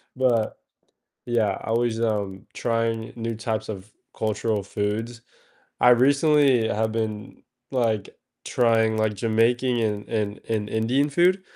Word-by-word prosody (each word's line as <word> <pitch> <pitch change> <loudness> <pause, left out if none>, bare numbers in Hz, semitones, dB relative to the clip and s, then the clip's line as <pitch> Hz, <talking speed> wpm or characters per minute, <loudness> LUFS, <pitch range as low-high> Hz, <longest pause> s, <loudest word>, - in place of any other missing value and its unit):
But, 120 -4 +1 0.7
yeah, 115 -5 +1
always, 115 0 0
um, 100 -4 -2
trying 115 -1 -1
new 115 -1 -4
types 110 0 -3
of 100 -1 -7 0.3
cultural 105 -1 -1
foods. 110 +4 -3 0.6
I 125 - +7
recently 135 -1 +4
have 110 +1 -1
been, 110 -2 -4 0.3
like, 115 -6 0 0.3
trying, 115 -2 +2
like, 110 -1 +1
Jamaican 115 +4 +1
and 105 -2 -2
and 105 -2 -2
and 105 -2 -2
Indian 125 +7 +1
food, 180 +5 +3
115 Hz, 120 wpm, -24 LUFS, 110-120 Hz, 0.7 s, I